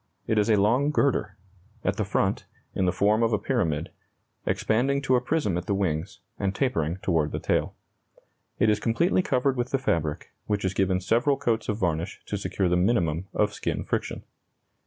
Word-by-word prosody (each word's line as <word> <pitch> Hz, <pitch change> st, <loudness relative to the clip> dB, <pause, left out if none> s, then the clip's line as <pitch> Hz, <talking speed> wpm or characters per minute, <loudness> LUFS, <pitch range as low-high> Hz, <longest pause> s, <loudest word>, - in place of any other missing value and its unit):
It 110 Hz, -, +1 dB
is 105 Hz, -, +1 dB
a 110 Hz, -, +5 dB
long 115 Hz, +8 st, +3 dB
girder; 140 Hz, -9 st, +1 dB, 0.5 s
at -, -, 0 dB
the -, -, +1 dB
front, -, -, 0 dB, 0.3 s
in 95 Hz, -, 0 dB
the 90 Hz, -, +3 dB
form 105 Hz, +4 st, +2 dB
of 115 Hz, -1 st, +2 dB
a -, -, +4 dB
pyramid, 85 Hz, -, -1 dB, 0.6 s
expanding 135 Hz, +5 st, +1 dB
to 130 Hz, -1 st, +3 dB
a 125 Hz, -, +2 dB
prism 125 Hz, -, 0 dB
at 90 Hz, -, -10 dB
the 100 Hz, -, +1 dB
wings, 90 Hz, 0 st, -2 dB, 0.2 s
and 100 Hz, -1 st, -1 dB
tapering 90 Hz, -, 0 dB
toward 80 Hz, -5 st, +1 dB
the -, -, -2 dB
tail. -, -, 0 dB, 0.8 s
It 110 Hz, -, +3 dB
is 105 Hz, -, +1 dB
completely 165 Hz, -, +2 dB
covered 135 Hz, -4 st, +1 dB
with 120 Hz, +1 st, -1 dB
the 135 Hz, -, +1 dB
fabric, 80 Hz, -, -2 dB, 0.2 s
which 105 Hz, -2 st, -1 dB
is 95 Hz, -, 0 dB
given 95 Hz, -1 st, +1 dB
several 120 Hz, +9 st, +2 dB
coats 115 Hz, -1 st, -1 dB
of 105 Hz, -, 0 dB
varnish 85 Hz, -5 st, -2 dB
to -, -, -3 dB
secure 95 Hz, -, -1 dB
the 90 Hz, -, +2 dB
minimum 90 Hz, -4 st, +1 dB
of 105 Hz, 0 st, +1 dB
skin -, -, -3 dB
friction. -, -, -3 dB
105 Hz, 190 wpm, -26 LUFS, 90-120 Hz, 0.8 s, a